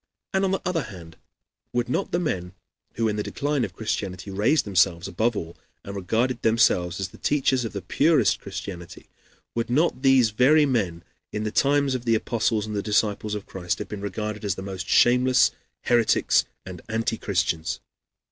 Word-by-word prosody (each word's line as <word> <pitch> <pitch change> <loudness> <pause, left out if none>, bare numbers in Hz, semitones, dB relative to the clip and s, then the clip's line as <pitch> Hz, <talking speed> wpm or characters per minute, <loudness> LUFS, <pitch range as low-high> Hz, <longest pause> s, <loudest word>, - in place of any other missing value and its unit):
And, 190 0 +2
on 195 - +2
the 190 - -1
other 175 -2 0
hand, 90 - -10 0.6
would 120 0 0
not 130 +10 -1
the - - +1
men 95 - -2 0.4
who, 115 -1 +1
in 105 -1 -1
the - - 0
decline 145 +4 -1
of 105 - -4
Christianity 100 -3 -4
raised 115 +10 +2
themselves 90 -3 +2
above 110 +6 0
all, 85 -3 -5 0.3
and 100 - -7
regarded 115 +7 0
themselves 100 -6 +2
as 95 -2 -3
the - - -16
teachers 130 -4 +1
of 115 - -5
the 100 -3 -5
purest 145 - +3
Christianity, 95 -3 -8 0.4
would 115 0 -2
not 145 +1 +1
these 130 -4 +5
very 145 +8 +5
men, 95 -11 -1 0.3
in 105 - -3
the 105 - -2
times 140 +2 +2
of 125 -1 -4
the 115 -1 +3
apostles 110 -1 0
and 105 -2 -3
disciples 105 0 0
of 105 - -6
Christ, 90 -2 -3
have - - -6
been 105 -2 -6
regarded 105 +1 -4
as 100 -3 -1
the 95 - -7
most 95 -1 -6
shameless 125 +1 +5 0.3
heretics 120 -2 +3 0.2
and 90 -2 -8
anti 115 0 -1
Christians?" 95 -6 -1
110 Hz, 180 wpm, -25 LUFS, 95-125 Hz, 0.6 s, these